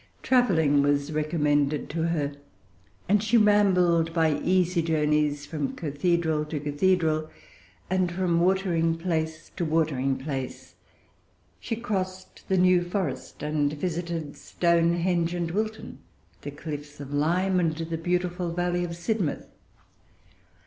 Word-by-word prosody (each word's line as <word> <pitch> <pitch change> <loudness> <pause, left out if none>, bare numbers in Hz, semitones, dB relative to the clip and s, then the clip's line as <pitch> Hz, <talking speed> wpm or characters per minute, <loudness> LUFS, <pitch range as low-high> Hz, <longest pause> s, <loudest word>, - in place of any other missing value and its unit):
Travelling 165 - +3
was 145 +1 +1
recommended 150 -2 0
to 165 +1 -1
her; 150 -4 -1 0.7
and 205 +1 +3
she 220 +2 +3
rambled 180 -6 +3
by 160 -3 +2
easy 180 0 +2
journeys 150 -2 +1
from 145 -2 -3
cathedral 160 0 0
to 150 0 -4
cathedral, 155 +1 +1 0.6
and 185 -1 0
from 175 -1 +1
watering 170 -3 +1
place 160 -2 -3
to 180 - -1
watering 150 -5 +1
place. 135 -2 -6 0.9
She 230 - -3
crossed 190 -5 -5
the 190 - +2
New 180 -1 +4
Forest, 175 -7 -4
and 150 -1 0
visited 165 -1 -3
Stonehenge 170 0 +1
and 170 -1 -2
Wilton, 215 +3 -4 0.4
the - - -6
cliffs 145 0 -7
of 140 0 -7
Lyme, 180 +6 +2
and 165 -3 +1
the 165 +1 -4
beautiful 175 +1 -1
valley 175 +1 -1
of 170 -1 -4
Sidmouth. 175 -2 -2
165 Hz, 120 wpm, -26 LUFS, 150-180 Hz, 0.9 s, New